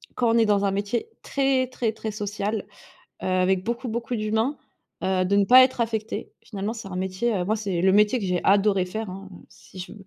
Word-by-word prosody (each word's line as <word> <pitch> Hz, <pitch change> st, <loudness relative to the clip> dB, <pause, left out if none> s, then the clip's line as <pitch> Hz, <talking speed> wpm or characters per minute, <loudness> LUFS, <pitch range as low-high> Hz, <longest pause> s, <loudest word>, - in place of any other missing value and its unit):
quand 240 Hz, -2 st, +1 dB
on -, -, +4 dB
est 225 Hz, -, +4 dB
dans 205 Hz, -1 st, +2 dB
un 195 Hz, -, +1 dB
métier, 205 Hz, -, -2 dB
très, 270 Hz, -2 st, +1 dB
très, 240 Hz, -3 st, -2 dB
très 220 Hz, 0 st, -5 dB
social, 205 Hz, 0 st, -3 dB, 0.6 s
heu, -, -, -3 dB
avec 185 Hz, 0 st, +1 dB
beaucoup, 235 Hz, +2 st, -3 dB
beaucoup 235 Hz, +2 st, -3 dB
d'humains, 220 Hz, +6 st, 0 dB, 0.5 s
heu, 185 Hz, -1 st, +1 dB
de 200 Hz, +2 st, +2 dB
ne 200 Hz, -, +4 dB
pas 255 Hz, +5 st, +8 dB
être 255 Hz, -1 st, +1 dB
affecté. 225 Hz, -1 st, -4 dB
Finalement, 205 Hz, 0 st, -4 dB
c'est 220 Hz, -4 st, -8 dB
un 180 Hz, -, -6 dB
métier, 190 Hz, +5 st, -1 dB
heu, 180 Hz, -, -1 dB
moi, 210 Hz, +4 st, +1 dB
c'est 195 Hz, -5 st, -2 dB
le 190 Hz, 0 st, +4 dB
métier 210 Hz, +5 st, +4 dB
que 215 Hz, -, -4 dB
j'ai 180 Hz, -2 st, 0 dB
adoré 195 Hz, -1 st, +3 dB
faire, 215 Hz, +2 st, -5 dB
hein, 195 Hz, +1 st, -9 dB, 0.2 s
si 185 Hz, -, -16 dB
je 185 Hz, -, -7 dB
210 Hz, 220 wpm, -24 LUFS, 190-230 Hz, 0.6 s, pas